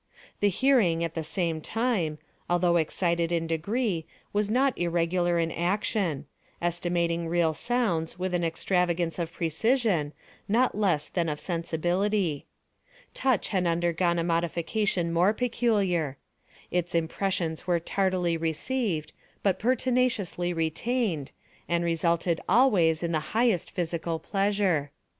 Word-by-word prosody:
The 205 Hz, -, +3 dB
hearing, 195 Hz, -7 st, +3 dB
at 165 Hz, -1 st, -2 dB
the 165 Hz, -, -3 dB
same 165 Hz, 0 st, -1 dB
time, 210 Hz, -8 st, -1 dB, 0.3 s
although 175 Hz, 0 st, +3 dB
excited 170 Hz, +1 st, 0 dB
in 165 Hz, -1 st, 0 dB
degree, 170 Hz, +2 st, -1 dB, 0.3 s
was 205 Hz, 0 st, +1 dB
not 260 Hz, +3 st, +2 dB
irregular 175 Hz, 0 st, +1 dB
in 165 Hz, -1 st, 0 dB
action—estimating 175 Hz, -, -1 dB
real 165 Hz, -1 st, +2 dB
sounds 180 Hz, -7 st, -1 dB
with 185 Hz, 0 st, -2 dB
an 175 Hz, -1 st, +1 dB
extravagance 170 Hz, 0 st, 0 dB
of 170 Hz, -1 st, -2 dB
precision, 175 Hz, -, +1 dB, 0.4 s
not 240 Hz, +3 st, +2 dB
less 190 Hz, -8 st, +1 dB
than 170 Hz, -3 st, -1 dB
of 150 Hz, -1 st, -3 dB
sensibility. 175 Hz, 0 st, -1 dB, 0.7 s
Touch 260 Hz, -4 st, +1 dB
had 185 Hz, -4 st, +1 dB
undergone 170 Hz, +1 st, +1 dB
a 170 Hz, -, +1 dB
modification 170 Hz, +2 st, 0 dB
more 180 Hz, +5 st, +4 dB
peculiar. 205 Hz, -, 0 dB, 0.5 s
Its 175 Hz, -1 st, -1 dB
impressions 165 Hz, 0 st, -1 dB
were 175 Hz, -1 st, +2 dB
tardily 180 Hz, -1 st, 0 dB
received, 165 Hz, -, -2 dB, 0.3 s
but 190 Hz, -2 st, +2 dB
pertinaciously 250 Hz, -7 st, +1 dB
retained, 165 Hz, -, -1 dB, 0.4 s
and 170 Hz, 0 st, +1 dB
resulted 170 Hz, 0 st, +1 dB
always 180 Hz, -8 st, +4 dB
in 170 Hz, -, -1 dB
the 155 Hz, +4 st, -3 dB
highest 225 Hz, -7 st, +2 dB
physical 170 Hz, -2 st, -2 dB
pleasure. 195 Hz, -5 st, 0 dB
175 Hz, 120 wpm, -27 LUFS, 165-205 Hz, 0.7 s, more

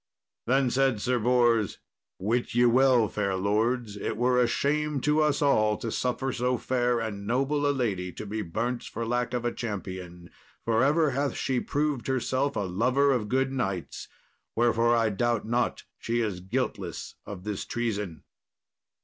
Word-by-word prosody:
Then 130 Hz, 0 st, +3 dB
said 135 Hz, -4 st, +2 dB
Sir 125 Hz, +3 st, 0 dB
Bors, 120 Hz, -2 st, +2 dB, 0.4 s
"Wit 115 Hz, +5 st, -1 dB
ye 120 Hz, 0 st, +5 dB
well, 125 Hz, -1 st, +5 dB
fair 100 Hz, -2 st, -1 dB
lords, 105 Hz, +3 st, 0 dB
it 105 Hz, +1 st, -3 dB
were 125 Hz, +1 st, +3 dB
a 120 Hz, -, +3 dB
shame 150 Hz, +3 st, 0 dB
to 150 Hz, +3 st, +2 dB
us 150 Hz, -1 st, +2 dB
all 110 Hz, -7 st, +3 dB
to 115 Hz, -, -4 dB
suffer 130 Hz, +2 st, -1 dB
so 125 Hz, +1 st, 0 dB
fair 120 Hz, 0 st, 0 dB
and 100 Hz, -3 st, -4 dB
noble 135 Hz, +5 st, +1 dB
a -, -, +4 dB
lady 100 Hz, -9 st, -1 dB
to -, -, -7 dB
be 110 Hz, +2 st, -3 dB
burnt 115 Hz, +7 st, -2 dB
for 115 Hz, -, -5 dB
lack 120 Hz, +1 st, -1 dB
of 120 Hz, -1 st, -2 dB
a 120 Hz, -, 0 dB
champion, 90 Hz, -5 st, -6 dB, 0.3 s
for 115 Hz, +1 st, +2 dB
ever 150 Hz, +2 st, +3 dB
hath 140 Hz, +2 st, -1 dB
she 130 Hz, -2 st, 0 dB
proved 145 Hz, -3 st, -1 dB
herself 130 Hz, +2 st, 0 dB
a -, -, 0 dB
lover 125 Hz, +9 st, +2 dB
of 115 Hz, -6 st, 0 dB
good 130 Hz, +2 st, +1 dB
knights; 95 Hz, -, -3 dB, 0.5 s
wherefore 120 Hz, 0 st, +3 dB
I 115 Hz, -2 st, +2 dB
doubt 115 Hz, +2 st, 0 dB
not 120 Hz, +2 st, 0 dB, 0.2 s
she 120 Hz, +1 st, -1 dB
is 105 Hz, -5 st, -2 dB
guiltless 95 Hz, -3 st, -3 dB
of 95 Hz, -3 st, -7 dB
this 105 Hz, -1 st, -3 dB
treason." 105 Hz, -8 st, -3 dB
120 Hz, 165 wpm, -27 LUFS, 105-130 Hz, 0.5 s, ye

